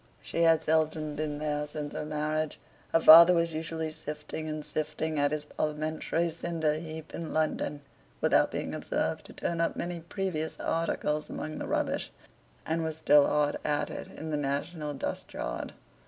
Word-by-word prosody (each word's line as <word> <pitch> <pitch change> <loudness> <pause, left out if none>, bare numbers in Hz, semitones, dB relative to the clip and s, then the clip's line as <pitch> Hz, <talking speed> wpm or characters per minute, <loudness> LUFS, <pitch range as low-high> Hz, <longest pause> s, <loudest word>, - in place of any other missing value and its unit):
She 170 - -2
had 165 -1 +5
seldom 155 -1 +1
been 150 -1 -3
there 150 0 -1
since 150 0 -5
her - - -3
marriage. 155 0 -2 0.3
Her 165 - +5
father 170 +2 +10
was 170 -1 +1
usually 160 0 -3
sifting 150 +1 -5
and 155 -1 -4
sifting 155 +1 -2
at 145 0 +3
his 150 0 -3
parliamentary 155 +3 -1
cinder 165 -2 -1
heap 160 0 -7
in 165 -1 -5
London 155 -2 0 0.4
(without - - +4
being - - -4
observed - - -2
to - - -12
turn 170 -1 -2
up 165 - +1
many 175 0 -3
precious 165 -2 -3
articles 155 -2 -1
among 155 0 -5
the - - -4
rubbish), - - -1 0.5
and 165 +1 0
was 160 -1 -3
still 150 -2 +6
hard 150 -1 +2
at 150 -1 0
it - - -6
in 160 0 -7
the 150 - 0
national 145 +2 -2
dust - - -4
yard. - - -4
155 Hz, 170 wpm, -29 LUFS, 150-160 Hz, 0.5 s, father